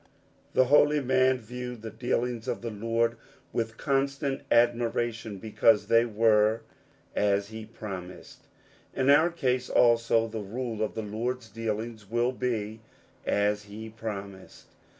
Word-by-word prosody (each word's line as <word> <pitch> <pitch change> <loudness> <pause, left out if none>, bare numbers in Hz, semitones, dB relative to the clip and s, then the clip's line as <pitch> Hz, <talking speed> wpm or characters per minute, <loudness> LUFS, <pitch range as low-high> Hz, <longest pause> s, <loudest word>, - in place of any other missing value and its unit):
That 130 - +6
holy 150 +2 +5
man 130 -1 +3
viewed 125 0 -7
the 110 - -6
dealings 120 0 -2
of - - -3
the 115 - -3
Lord 115 +2 0 0.4
with 115 -1 -2
constant 135 0 0
admiration, 115 -2 +1
because 110 +1 +3
they 115 0 +5
were 110 -1 +3 0.5
"as 100 0 +1
he 110 -1 -8
promised." 95 -5 -9 0.5
In 135 +1 +3
our 155 +4 +6
case, 130 -7 -1
also, 115 -1 +4
the 110 0 -5
rule 115 +2 -4
of 110 - -1
the 110 - -3
Lord's 115 +3 -3
dealings 110 -1 -4
will 120 +2 +1
be 115 -4 -3 0.2
" - - -33
as 105 0 +1
he 110 +2 -8
promised." 100 -4 -8
115 Hz, 135 wpm, -28 LUFS, 110-125 Hz, 0.5 s, That